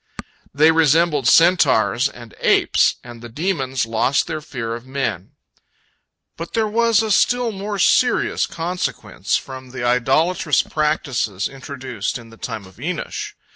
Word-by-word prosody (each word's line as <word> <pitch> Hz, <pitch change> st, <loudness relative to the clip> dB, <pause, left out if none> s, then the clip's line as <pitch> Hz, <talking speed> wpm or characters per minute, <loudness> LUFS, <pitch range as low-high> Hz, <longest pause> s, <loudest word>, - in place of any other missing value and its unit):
They 155 Hz, +3 st, +5 dB
resembled 160 Hz, -3 st, +3 dB
centaurs 150 Hz, -6 st, +4 dB
and 120 Hz, -4 st, -13 dB
apes, -, -, +3 dB
and 120 Hz, -1 st, -11 dB
the 120 Hz, -, -9 dB
demons 135 Hz, -3 st, -2 dB
lost 115 Hz, +4 st, +1 dB
their 155 Hz, -2 st, -5 dB
fear 115 Hz, -6 st, -5 dB
of 120 Hz, 0 st, -7 dB
men. 130 Hz, -9 st, -3 dB, 1.0 s
But 165 Hz, +1 st, -7 dB
there 225 Hz, -1 st, +1 dB
was 230 Hz, 0 st, +2 dB
a 220 Hz, -, -2 dB
still 245 Hz, +3 st, +2 dB
more 205 Hz, 0 st, -5 dB
serious 245 Hz, +6 st, +2 dB
consequence 175 Hz, +2 st, -3 dB
from 130 Hz, -1 st, -9 dB
the 130 Hz, -1 st, -6 dB
idolatrous 145 Hz, +7 st, +2 dB
practices 135 Hz, -10 st, -1 dB
introduced 135 Hz, -5 st, -5 dB
in 115 Hz, -2 st, -14 dB
the 115 Hz, -, -15 dB
time 110 Hz, -2 st, -6 dB
of 95 Hz, +1 st, -17 dB
Enosh. 165 Hz, +5 st, -4 dB
140 Hz, 135 wpm, -20 LUFS, 120-175 Hz, 1.0 s, They